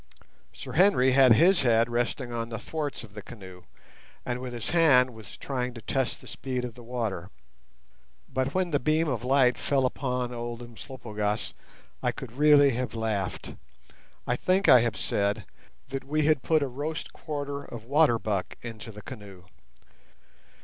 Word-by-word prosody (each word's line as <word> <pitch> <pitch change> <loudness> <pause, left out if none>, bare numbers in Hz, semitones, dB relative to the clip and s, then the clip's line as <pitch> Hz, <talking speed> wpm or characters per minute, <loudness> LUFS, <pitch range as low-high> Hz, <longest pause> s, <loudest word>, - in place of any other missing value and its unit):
Sir - - -9
Henry 170 -8 +4
had 130 -2 +7
his 175 - +5
head 115 -2 +4
resting 120 +1 -2
on 115 0 -3
the 115 - -4
thwarts 150 -2 -4
of 105 -3 -13
the 105 - -7
canoe, 95 -5 -12 0.6
and 125 0 -2
with 125 -1 -6
his 120 -3 -4
hand 135 -7 +5
was 110 -5 -12
trying 125 -2 -3
to 115 - -8
test 135 -2 -1
the - - -14
speed 125 -2 -4
of 120 - -6
the 120 - -13
water. 115 -7 -3 1.0
But 130 +1 -2
when 185 -2 +1
the 145 - +2
beam 155 +4 +2
of 125 -5 -2
light 125 -2 +3
fell 135 -2 +1
upon 125 -1 -2
old 120 0 -5
Umslopogaas 110 -3 -4 0.5
I - - +1
could 130 - -8
really 145 +1 +6
have 125 0 -3
laughed. 110 -4 -3 0.7
I 125 - +1
think 185 +8 +1
I 125 - +9
have 120 -1 0
said 100 0 -1 0.4
that 135 0 -4
we 155 +2 0
had 155 -3 +3
put 155 +1 +2
a - - -1
roast 145 +5 -5
quarter 145 -2 -5
of 120 -5 -9
water 140 -2 +4
buck 105 -4 -2
into 115 -1 -7
the 105 -1 -11
canoe. 100 -7 -10
125 Hz, 170 wpm, -27 LUFS, 115-140 Hz, 1.0 s, I